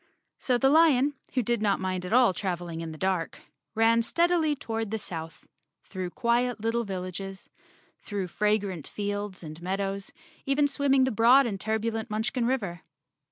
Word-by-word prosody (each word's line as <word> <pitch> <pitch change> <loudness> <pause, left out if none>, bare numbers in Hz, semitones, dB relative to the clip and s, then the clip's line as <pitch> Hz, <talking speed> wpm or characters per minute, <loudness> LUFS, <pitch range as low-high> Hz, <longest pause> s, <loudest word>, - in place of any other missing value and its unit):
So 250 -2 +1
the 270 +2 +3
lion, 295 -3 +5 0.2
who 250 - +2
did 235 0 0
not 205 -2 +2
mind 185 -1 -2
at - - -7
all 245 -4 +5
traveling 175 -4 -4
in 165 -1 -5
the 155 - -9
dark, 185 -2 -1 0.4
ran 225 +1 +4
steadily 335 +3 +2
toward 225 -5 -4
the 220 - -2
south, 165 -5 -7 0.4
through 185 -2 -5
quiet 240 +1 0
little 230 +2 0
villages, 190 -1 -6 0.5
through 200 -3 -4
fragrant 205 -5 0
fields 205 -2 -4
and 155 +1 -9
meadows, 195 +2 -3 0.3
even 285 +1 +2
swimming 275 -1 +2
the 260 - +1
broad 245 +5 +6
and 200 -5 -3
turbulent 220 0 -2
Munchkin 220 +3 -1
river. 200 -10 -2
215 Hz, 160 wpm, -27 LUFS, 190-245 Hz, 0.5 s, broad